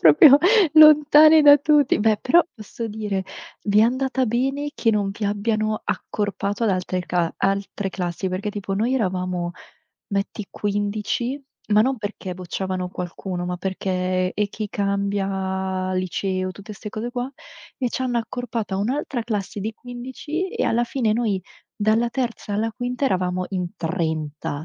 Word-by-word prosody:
proprio 270 - +8 0.4
lontani 305 0 +8
da 290 0 +9
tutti. 295 -3 +3
Beh, 215 -1 +3
però 335 +7 +4
posso 225 +1 -7
dire: 205 -3 -3 0.4
vi 205 0 +3
è - - +7
andata 260 +2 +1
bene 270 +5 -1
che 225 - +2
non 205 -2 0
vi 205 +1 -5
abbiano 215 +1 0
accorpato 205 +1 -2
ad 215 - +3
altre 185 0 -1
cla 175 -2 -1
altre 195 0 -1
classi. 180 +1 -3
Perché 185 +3 -3
tipo 200 -1 -4
noi 230 +6 +1
eravamo 180 -6 -1 0.6
metti 200 +1 -2
15,,ma 210 +3 -1
non 260 +3 +2
perché 205 -3 -5
bocciavano 185 0 -4
qualcuno, 180 0 -5
ma 180 0 -2
perché: 185 -1 -1
e 210 0 0
chi 210 0 -5
cambia 195 -2 -1
liceo, 185 +1 -2
tutte 200 +2 -10
'ste 210 +1 -8
cose 225 +3 -4
qua 250 +1 -3 0.5
e 250 -2 0
c'hanno 245 -1 -1
accorpato 230 -3 -4
a - - 0
un'altra 250 +4 -2
classe 210 -3 -3
di 220 +3 -3
15 260 - -5
e - - -1
alla 240 +1 +2
fine 235 -3 0
noi 215 -5 0 0.3
dalla 220 +3 +2
terza 235 -5 -3
alla 225 +2 0
quinta 245 +4 -3
eravamo 185 -3 0
in 180 -3 -3
30, 160 -3 -3
205 Hz, 150 wpm, -23 LUFS, 190-240 Hz, 0.6 s, da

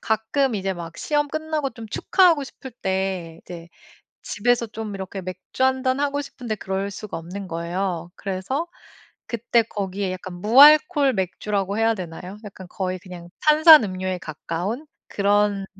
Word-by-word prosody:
가끔 220 +4 0
이제 195 -1 -1
막 170 -2 -8
시험 295 -1 0
끝나고 310 -2 -2
좀 225 -1 -10
축하하고 335 - +3
싶을 265 0 -11
때 190 -6 -3
이제 170 -1 -10 0.5
집에서 240 +2 +1
좀 215 -1 -6
이렇게 190 0 -6
맥주 185 +7 -6
한 260 0 +2
잔 260 +1 +1
하고 285 0 0
싶은데 250 -5 -5
그럴 195 +1 -3
수가 205 -1 -7
없는 185 +4 -7
거예요. 170 +1 -3
그래서 200 - -3 0.6
그때 235 0 +1
거기에 195 -3 -3
약간 185 0 -7
무알콜 290 - +6
맥주라고 200 +1 -2
해야 225 0 +3
되나요? 180 0 -8
약간 190 -2 -10
거의 185 -1 -3
그냥 180 -2 -11
탄산음료에 225 - +6
가까운 175 - -5 0.2
그런 205 -1 +1
205 Hz, 315 characters per minute, -23 LUFS, 185-260 Hz, 0.6 s, 무알콜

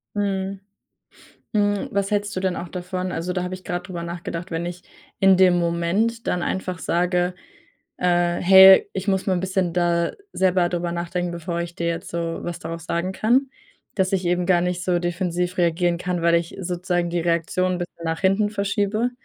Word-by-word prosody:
Mhm. 195 -1 -2 0.9
Hm, 205 -1 +1
was 200 +1 -1
hältst 205 0 -1
du - - -1
denn 185 -1 -1
auch 175 - -6
davon? 185 0 -4
Also, 180 +1 -3
da 180 - -1
habe 180 0 -4
ich 185 - -14
grad 180 -1 -4
drüber 175 -3 -5
nachgedacht. 170 +1 -6
Wenn 165 +1 -2
ich 175 0 -8 0.4
in 195 0 +6
dem 180 -1 +5
Moment 175 +7 0
dann 180 - 0
einfach 185 -1 -3
sage, 180 +1 0 0.7
äh: 175 -1 +2
„Hey, 190 +1 +8
ich 190 0 -4
muss 190 -2 0
mal 190 - +2
'n 175 - -1
bisschen 185 -1 -1
da 170 -1 +1 0.2
selber 185 -2 +2
drüber 175 0 -2
nachdenken, 175 +1 -2
bevor 170 0 -4
ich 170 0 -6
dir 170 - -2
jetzt 165 0 -4
so 170 -1 -3
was 175 -1 -5
darauf 165 0 -6
sagen 170 +3 -2
kann.” 245 +7 +2 0.5
Dass 190 -1 0
ich 190 -1 0
eben 175 0 +1
gar 180 -2 +4
nicht 180 0 -2
so 175 0 +1
defensiv 175 0 -2
reagieren 170 0 +1
kann, 180 -1 -2
weil 170 0 +4
ich 170 0 -1
sozusagen 175 -1 -1
die 175 0 0
Reaktion 170 +2 0
'n - - -3
bisschen 175 -1 -7
nach 165 0 -2
hinten 195 +2 +2
verschiebe 205 +3 0
180 Hz, 195 wpm, -23 LUFS, 170-190 Hz, 0.9 s, Hey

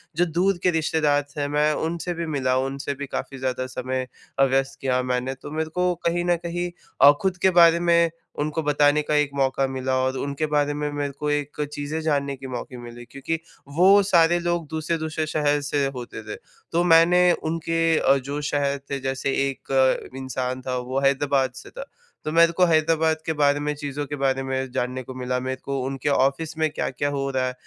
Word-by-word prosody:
जो 175 - +3
दूर 175 +3 +1
के 180 - +4
रिश्तेदार 155 -2 +1
थे 145 -1 -1
मैं 150 +1 +2
उनसे 170 +3 -3
भी 170 0 -4
मिला 135 -5 0
उनसे 135 +2 -2
भी 140 +1 -5
काफ़ी 135 - -5
ज़्यादा 130 -1 -2
समय 130 0 -3 0.3
अ, 135 - +6
व्यस्त 135 0 +1
किया 130 -1 +1
मैंने। 125 +1 -1
तो 145 - -10
मेरे 160 +1 -2
को 180 +2 0
कहीं 175 +1 +1
न 175 0 +3
कहीं 175 +1 -3 0.3
अ, 145 - +10
ख़ुद 190 -2 0
के 190 - +5
बारे 170 0 +7
में 170 -1 +3 0.3
उनको 155 +2 -1
बताने 145 0 +3
का 150 0 -1
एक 150 -1 +2
मौका 135 0 +1
मिला, 130 0 -2
और 130 0 -1
उनके 140 +3 -2
बारे 145 -1 +1
में 150 0 -3
मेरे 145 -1 -3
को 150 - -1
एक 145 0 -2
चीज़ें 145 +2 -3
जानने 140 -3 0
के 135 0 -9
मौके 125 0 -6
मिले। 120 0 -10
क्योंकि 140 +6 -4 0.4
वो 195 +3 +7
सारे 175 -3 +4
लोग 175 -2 -1
दूसरे-दूसरे 160 0 -2
शहर 145 -1 +1
से 145 -1 0
होते 120 -3 -7
थे। 105 - -6 0.4
तो 170 +1 +2
मैंने 175 +1 +5
उनके 165 +1 -2 0.2
अ, 135 - +4
जो 140 +3 -4
शहर 140 -1 0
थे 140 - -1
जैसे 135 +1 -2 0.2
एक 130 -1 0
इंसान 130 -1 -3
था 125 0 -3
वो 125 +2 -2
हैदराबाद 140 -1 +2
से - - -11
था, - - -8 0.4
तो 155 - -3
मेरे 170 0 +6
को 180 +2 +3
हैदराबाद 160 -1 +2
के 160 - 0
बारे 145 0 +4
में 150 0 -1
चीज़ों 145 0 -4
के 145 - -5
बारे 135 -1 0
में 130 -1 -3
जानने 125 +1 -2
को 130 - -9
मिला 125 0 -2
मेरे 130 +1 -3
को 140 -1 -3
उनके 135 +1 -2
ऑफ़िस 140 +3 +1
में 160 0 +1
क्या-क्या 145 -1 -2
हो 140 -1 -2
रहा 130 -1 0
है 125 - -3
145 Hz, 205 wpm, -24 LUFS, 135-160 Hz, 0.4 s, अ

